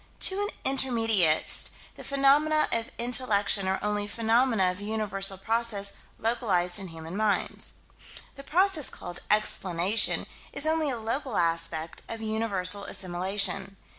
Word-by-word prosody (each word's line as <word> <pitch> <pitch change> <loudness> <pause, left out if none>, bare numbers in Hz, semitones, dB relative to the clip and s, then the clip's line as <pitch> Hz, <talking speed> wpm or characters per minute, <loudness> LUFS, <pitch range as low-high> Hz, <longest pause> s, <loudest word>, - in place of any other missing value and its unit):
To 385 +1 +4
an 410 - -1 0.3
intermediatist, 225 -11 +3 0.2
the - - -11
phenomena 285 +3 +3
of 230 0 0
intellection 215 -5 +1
are 190 0 +1
only 205 0 -1
phenomena 225 -2 +2
of 180 +2 -9
universal 205 -2 0
process 215 -1 -1 0.2
localized 205 -6 +1
in 195 - -5
human 165 +1 -8
minds. 210 -1 +1 0.6
The 275 - -11
process 355 -1 +2
called 175 - -7
"explanation" 200 -1 +1 0.3
is 290 - -3
only 315 -1 +1
a 250 - -2
local 230 +2 -3
aspect 165 -1 -1
of 225 - -5
universal 205 -3 0
assimilation. 195 +2 -1
210 Hz, 125 wpm, -27 LUFS, 190-240 Hz, 0.6 s, To